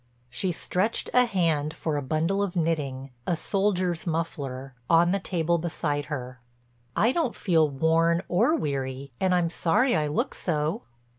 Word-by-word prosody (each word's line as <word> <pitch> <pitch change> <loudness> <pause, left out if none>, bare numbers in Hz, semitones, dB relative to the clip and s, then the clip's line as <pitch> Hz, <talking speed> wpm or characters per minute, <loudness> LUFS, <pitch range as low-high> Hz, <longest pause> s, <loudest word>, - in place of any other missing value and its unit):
She 180 +9 -1
stretched 185 +5 -1
a 250 0 +6
hand 165 -8 0
for 155 -2 -2
a 145 - -1
bundle 160 +8 0
of 195 -2 -2
knitting—a 140 -4 -2
soldier's 185 -2 0
muffler—on 145 0 0
the 200 - +1
table 170 -2 0
beside 155 -3 -2
her: 130 -3 -6 0.5
"I 230 +4 +3
don't 315 -6 0
feel 160 -5 +2
worn 165 +4 +2
or 230 - +3
weary 135 - -3
and 185 -1 +2
I'm 170 -2 +1
sorry 175 +10 +2
I 155 -2 +1
look 145 - -1
so." 155 -2 -1
165 Hz, 145 wpm, -26 LUFS, 145-180 Hz, 0.5 s, a